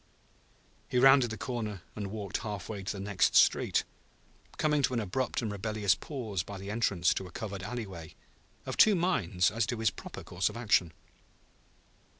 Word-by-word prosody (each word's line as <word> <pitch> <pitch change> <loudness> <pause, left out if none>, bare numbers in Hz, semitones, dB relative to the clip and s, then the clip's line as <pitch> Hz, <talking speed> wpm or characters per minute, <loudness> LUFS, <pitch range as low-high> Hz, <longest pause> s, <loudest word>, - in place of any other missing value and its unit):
He - - 0
rounded 135 -1 +6
the 110 - -5
corner 105 -5 -4
and 105 -2 -4
walked 100 -2 -4
half 105 -4 -5
way 105 -3 -4
to 95 - -3
the 100 - -7
next 100 -1 +1
street, - - +4 0.7
coming 150 -1 +2
to 130 -2 +1
an - - +1
abrupt 120 +5 -2
and 110 - -2
rebellious 105 -1 +1
pause 115 - -4
by 100 +3 -8
the 100 +1 -6
entrance 100 -6 +2
to 95 - -4
a - - -13
covered 100 -4 -5
alleyway, 95 -7 -6 0.5
of - - -4
two 215 -2 +7
minds 95 - +1
as 110 0 0
to 120 - -2
his 110 -1 +2
proper - - -9
course 90 +3 -1
of 105 - -8
action. 105 -7 +2
105 Hz, 175 wpm, -30 LUFS, 95-120 Hz, 0.7 s, two